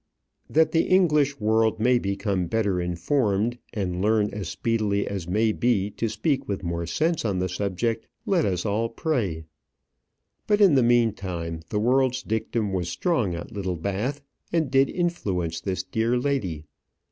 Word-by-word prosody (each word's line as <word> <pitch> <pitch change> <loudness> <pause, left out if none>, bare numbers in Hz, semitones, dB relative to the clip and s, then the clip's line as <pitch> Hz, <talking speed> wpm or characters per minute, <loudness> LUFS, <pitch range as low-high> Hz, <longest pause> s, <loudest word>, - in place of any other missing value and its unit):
That 160 +1 +3
the 165 - +2
English 150 -7 +3
world 110 +1 +2
may 125 +2 +3
become 100 -3 -1
better 100 -3 0
informed, 105 - 0
and 90 -5 -2
learn 105 0 +2
as 100 -5 -5
speedily 105 -1 0
as 95 -4 -4
may 110 +4 +2
be 105 -3 +1
to 115 - -2
speak 135 - -1
with 100 -1 -3
more 85 -1 -3
sense 160 - 0
on 100 -5 0
the 90 0 0
subject, 100 +5 -2 0.2
let 180 -5 +2
us 90 -1 -1
all 110 +2 0
pray. 115 - -1 1.0
But, 210 -1 +3
in 195 -6 +6
the 135 - +5
meantime, 100 -9 +1
the 105 - -1
world's 130 +2 +2
dictum 110 -1 -2
was 90 -2 -1
strong 115 - 0
at 85 - -7
Littlebath, 100 - -3 0.3
and 160 -5 0
did 135 0 +4
influence 95 - -2
this 95 -2 -2
dear 110 +6 0
lady. 105 - -2
110 Hz, 155 wpm, -25 LUFS, 95-125 Hz, 1.0 s, in